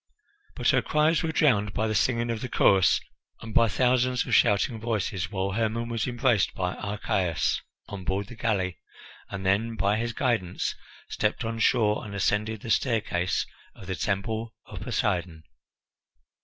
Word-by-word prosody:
But - - +1
her - - +4
cries 155 +1 +2
were 165 -2 -1
drowned 105 -11 +2
by 110 - +1
the 110 - -1
singing 115 +3 +1
of 115 -1 -3
the 125 - -4
chorus 95 -5 +4 0.4
and 115 -1 -8
by 115 +1 +5
thousands 125 +5 +2
of - - -3
shouting 110 +1 +3
voices, 105 -5 -2
while 95 -1 -2
Hermon 115 +2 -1
was 115 -1 -1
embraced 120 -3 +1
by 90 0 -1
Archias 95 -5 -1 0.3
on 100 -2 -7
board 95 +3 -1
the 110 - -11
galley, 100 -6 -1 0.5
and 100 -1 -6
then, 110 +4 +1
by 100 0 +1
his 120 +1 -1
guidance, 110 -9 -1 0.3
stepped 105 +3 -1
on 115 0 -3
shore 110 -2 +2
and 100 -2 -7
ascended 105 +2 0
the 115 - -3
staircase 105 -9 +1 0.3
of - - -12
the 95 0 -3
Temple 110 +4 -2
of - - -9
Poseidon. 85 -3 -1
110 Hz, 160 wpm, -27 LUFS, 95-115 Hz, 0.5 s, by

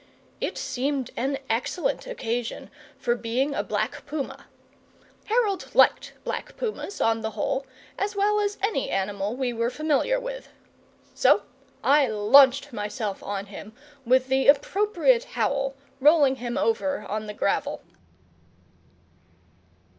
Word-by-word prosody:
It - - -3
seemed 265 0 -2
an 270 +3 -1
excellent 305 - -1
occasion 240 - -4 0.3
for 240 - 0
being 245 +4 -1
a - - 0
black - - -3
puma. 290 -2 -5 0.8
Harold 425 -4 0
liked - - +4
black - - -5
pumas, 430 -3 -4
on 225 0 +2
the 220 - -2
whole, 265 +6 -1 0.3
as 410 +1 -1
well 415 +1 +2
as 410 0 -1
any 410 -10 0
animal 200 +2 -2
we 255 -2 -1
were 230 0 0
familiar 310 - +1
with. - - -7 0.6
So - - +4 0.4
I 285 0 +5
launched 255 +6 +5
myself 210 -1 -4
on 200 -1 -4
him, 210 +1 -10 0.3
with 255 +1 +3
the 265 0 +1
appropriate 420 - +3
howl, 275 -1 0 0.2
rolling 285 -2 +5
him 240 -1 -4
over 280 +5 0
on 215 +1 -3
the 210 - -6
gravel. - - -1
270 Hz, 125 wpm, -25 LUFS, 230-345 Hz, 0.8 s, I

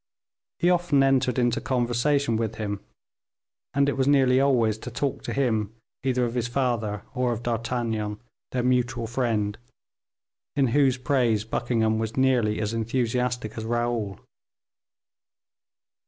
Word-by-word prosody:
He 175 - +3
often 175 -6 +3
entered 135 -2 +2
into 120 -2 +1
conversation 125 +1 +1
with 110 0 -1
him, 100 -2 -4 0.9
and 140 0 +3
it 140 - +1
was 135 0 +1
nearly 135 -2 +4
always 115 -6 +2
to 125 - -7
talk 135 +3 -2
to - - -3
him 110 -5 0 0.3
either 125 -2 +1
of 115 - -3
his 120 -1 -1
father 115 -5 -1
or 125 -2 0
of 115 0 -4
D'Artagnan, 115 -3 -2 0.3
their 125 -1 -1
mutual 125 -1 +1
friend, 115 -4 -1 1.0
in 135 -3 +3
whose 135 0 +3
praise 125 -5 +1
Buckingham 110 -1 0
was 110 +1 -3
nearly 125 -5 +2
as 105 +1 -2
enthusiastic 120 0 -1
as - - -5
Raoul. 120 -4 -1
120 Hz, 135 wpm, -25 LUFS, 110-130 Hz, 1.0 s, nearly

